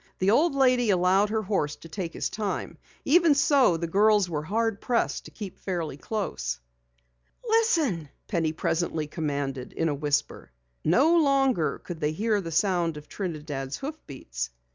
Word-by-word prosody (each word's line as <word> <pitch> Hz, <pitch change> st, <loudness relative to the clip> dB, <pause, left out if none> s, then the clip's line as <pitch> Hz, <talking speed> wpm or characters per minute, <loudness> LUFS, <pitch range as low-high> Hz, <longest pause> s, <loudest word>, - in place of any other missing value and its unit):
The 190 Hz, +2 st, +2 dB
old 290 Hz, +6 st, +3 dB
lady 250 Hz, -4 st, +3 dB
allowed 190 Hz, +2 st, +3 dB
her 220 Hz, 0 st, -1 dB
horse 170 Hz, -8 st, -1 dB
to -, -, -13 dB
take 170 Hz, 0 st, -5 dB
his -, -, -2 dB
time. 210 Hz, -2 st, -4 dB, 0.3 s
Even 330 Hz, 0 st, +5 dB
so, 275 Hz, -, +4 dB
the 170 Hz, -, -2 dB
girls 205 Hz, +3 st, +3 dB
were 155 Hz, -4 st, -2 dB
hard 220 Hz, +5 st, -1 dB
pressed 240 Hz, -2 st, 0 dB
to -, -, -9 dB
keep 200 Hz, -4 st, -8 dB
fairly 175 Hz, -6 st, -3 dB
close. 65 Hz, -, -3 dB, 0.9 s
"Listen!" 325 Hz, -, +2 dB, 0.2 s
Penny 165 Hz, -5 st, 0 dB
presently 160 Hz, 0 st, -1 dB
commanded 140 Hz, -4 st, -3 dB
in 165 Hz, -, 0 dB
a -, -, 0 dB
whisper. 145 Hz, -, -2 dB, 0.3 s
No 275 Hz, -, +4 dB
longer 270 Hz, -, +2 dB
could 175 Hz, -3 st, -7 dB
they 150 Hz, 0 st, 0 dB
hear 210 Hz, +3 st, 0 dB
the 165 Hz, -3 st, -6 dB
sound 170 Hz, -2 st, +1 dB
of 150 Hz, 0 st, -11 dB
Trinidad's 150 Hz, -7 st, -4 dB
hoofbeats. 130 Hz, -, -6 dB
180 Hz, 155 wpm, -27 LUFS, 155-225 Hz, 0.9 s, Even